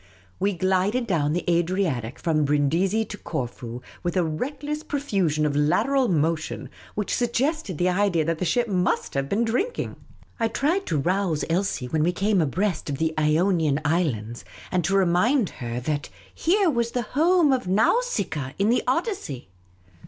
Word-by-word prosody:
We 200 +2 +1
glided 190 +7 +1
down 155 -7 +1
the 175 - -2
Adriatic 170 - 0
from 155 -3 +1
Brindisi 165 +10 +1
to 205 -1 -8
Corfu 120 -4 -5 0.2
with 175 +1 -2
a 180 - +3
reckless 285 - -3
profusion 195 - 0
of 145 -1 0
lateral 240 - +2
motion 160 - -1 0.2
which 210 -1 -2
suggested 245 - 0
the 180 - +1
idea 180 -4 +2
that 165 0 -1
the - - -1
ship 240 +8 +1
must 185 -3 0
have 135 0 -1
been 225 +4 +1
drinking. 375 - -2 0.4
I 225 - +2
tried 315 - 0
to 155 - 0
rouse 175 +1 0
Elsie 175 -7 0
when 155 +4 0
we 175 +3 +2
came 195 0 +2
abreast 170 +3 -1
of 140 - -2
the 160 +1 0
Ionian 155 -1 +2
Islands, 125 -9 -1 0.3
and 180 -2 +1
to 195 +4 +1
remind 195 +6 +3
her 120 0 -3
that 145 +2 -2 0.2
" - - -26
Here 385 +3 +2
was 235 -3 0
the 245 - 0
home 325 0 +4
of 250 -7 -1
Nausicaa 195 - +1
in 200 +2 +2
the 245 - +3
Odyssey." 255 - -2
180 Hz, 165 wpm, -24 LUFS, 155-230 Hz, 0.4 s, home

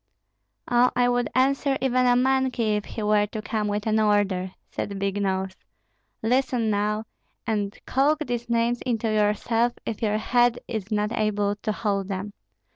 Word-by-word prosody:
"Oh, 245 +1 +4
I 245 0 +3
would 245 0 +1
answer 270 +1 +2
even 255 -1 +2
a 245 - +5
monkey 255 -4 +2
if 210 - -2
he 220 - -6
were 210 0 +3
to 215 - -6
come 210 0 -1
with 205 0 -2
an 220 0 +2
order," 205 -3 +2 0.2
said 200 -1 -4
Big 200 +1 -1
Nose. 190 -1 -1 0.7
"Listen 245 -1 +1
now, 210 +1 0 0.4
and 205 -2 -2
calk 285 +4 +2
these 240 -2 -3
names 235 +1 +1
into 225 -3 -1
yourself 225 +3 +1
if 225 - -4
your 215 -1 +1
head 240 +2 +2
is 220 -2 -5
not 210 0 0
able 210 -2 0
to 215 +1 -2
hold 200 -3 -1
them. 195 +1 -4
220 Hz, 165 wpm, -25 LUFS, 205-245 Hz, 0.7 s, a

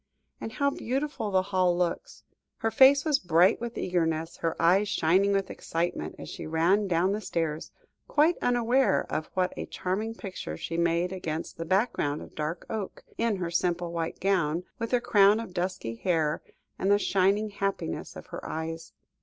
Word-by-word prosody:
And 220 - -6
how 280 0 +1
beautiful 270 -3 -2
the 190 -1 +2
hall 185 -2 +1
looks." 175 -1 -2 0.3
Her 225 - -1
face 275 +4 +6
was 300 -3 +3
bright 175 +5 +4
with 235 -1 -5
eagerness, 165 -2 -1
her 165 -1 -2
eyes 190 +5 +4
shining 190 +2 +3
with 195 -1 0
excitement, 170 +2 -3
as - - -8
she - - -7
ran 175 +6 +2
down 180 +1 +2
the 210 +1 -2
stairs, 160 -5 -3 0.4
quite 315 +4 +3
unaware 245 +2 +2
of 155 +1 -2
what 185 -1 +1
a - - -5
charming 215 +5 -3
picture 185 - -6
she 165 - -5
made 170 +1 +1
against 165 -4 -4
the 165 - -3
background 185 -6 0
of - - -13
dark 155 +3 -4
oak, 215 -4 -5 0.2
in 230 -2 +2
her 175 -3 -3
simple 175 0 0
white 165 -1 -3
gown, 175 -4 +1 0.2
with 230 -1 -2
her 245 -1 +2
crown 205 -1 +5
of 225 -6 -7
dusky 180 -9 -2
hair, 155 +2 0 0.4
and 195 - 0
the 205 - +6
shining 200 +2 +2
happiness 195 - -3
of - - -9
her - - -5
eyes. 165 +1 -5
185 Hz, 175 wpm, -28 LUFS, 165-210 Hz, 0.4 s, face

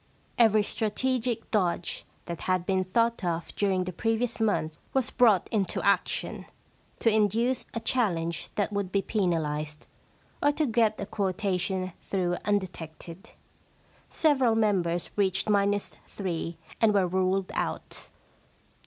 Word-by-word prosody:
Every 215 -2 +5
strategic 230 +2 -1
dodge 180 -4 0 0.2
that 170 -2 -6
had 185 -1 +2
been 190 -1 +1
thought 230 +4 +1
of 170 -1 -2
during 190 -2 +1
the 185 0 -5
previous 225 +5 0
month 200 -8 0 0.2
was 265 -2 +2
brought 220 -7 +4
into 205 -4 0
action, 200 0 0 0.5
to 230 - +4
induce 225 +4 +2
a - - 0
challenge 170 -10 0
that 205 0 0
would 200 -2 -2
be 195 0 +1
penalised, 155 -6 -1 0.6
or 290 - +4
to 310 - +1
get 225 -3 +2
a 200 - -3
quotation 190 -2 -1
through 175 -2 -1
undetected. 175 -3 -3 0.8
Several 265 -7 +3
members 185 -6 +1
reached 190 -1 +2
minus 205 -1 +2 0.2
three, 170 -3 -4 0.2
and 215 -2 +4
were 195 -2 +4
ruled 185 +1 0
out. - - -3
200 Hz, 125 wpm, -28 LUFS, 180-220 Hz, 0.8 s, Every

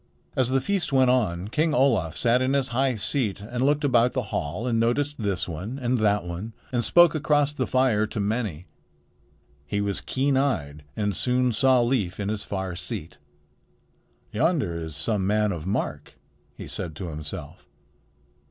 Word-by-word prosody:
As 130 -2 +2
the 135 0 +2
feast 195 +4 -1
went 130 -2 +4
on, 100 -7 0
King 155 +4 +1
Olaf 110 - +2
sat 120 +1 +3
in 130 +1 +1
his 135 -2 +1
high 130 +1 +1
seat 110 -1 -1
and 120 +5 -5
looked 145 +2 +2
about 125 -3 +3
the - - -1
hall 75 +11 -2
and 115 -2 +1
noticed 130 +4 0
this 100 -3 0
one 95 - -5
and 125 -2 0
that 105 -2 +2
one 90 +6 -6 0.2
and 120 -2 0
spoke 175 +3 +6
across 150 -2 +2
the 130 -3 -2
fire 125 -5 +2
to 110 - -5
many. 100 -5 -2 1.0
He 85 +8 -2
was 100 -1 -1
keen 135 +1 0
eyed 75 - -1
and 105 -2 -1
soon 125 +2 +2
saw 130 +2 +4
Leif 110 -8 -1
in 100 0 -2
his 105 -1 -2
far 95 -2 -4
seat. 90 -3 -3 1.1
"Yonder 155 - +1
is 80 -2 -5
some 95 +5 -1
man 105 0 +2
of 85 -2 -5
mark," 100 - -3 0.4
he - - -8
said 85 -5 -4
to 90 +2 -5
himself. 75 -1 -8
115 Hz, 170 wpm, -25 LUFS, 95-130 Hz, 1.1 s, spoke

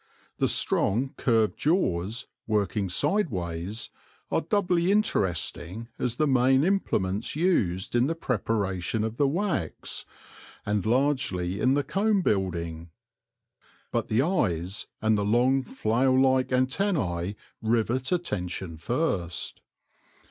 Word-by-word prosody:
The - - +3
strong, 130 +8 +1
curved 115 -5 +1
jaws, 115 - +1 0.2
working 105 -2 0
side 195 - +1
ways, 90 +2 -4 0.4
are - - +2
doubly 180 0 +1
interesting 110 - -1
as 120 -1 -1
the 155 - +2
main 130 0 +4
implements 110 - 0
used 105 - +1
in 120 +2 +4
the 165 - -1
preparation 105 - -1
of 110 +1 -3
the 140 - +3
wax, 165 - -2 0.6
and 105 0 0
largely 115 -8 +1
in 130 +4 +3
the 145 - +1
comb 200 +5 +1
building, 85 - -1 1.0
But - - -1
the 115 +5 +2
eyes 95 - -1 0.2
and 110 -1 +3
the - - 0
long, 125 +6 +3
flail 130 +1 +1
like 130 -1 +3
antennae 130 - 0 0.3
rivet 120 +3 0
attention 95 - -2
first. 90 - -2
115 Hz, 115 wpm, -27 LUFS, 95-140 Hz, 1.0 s, main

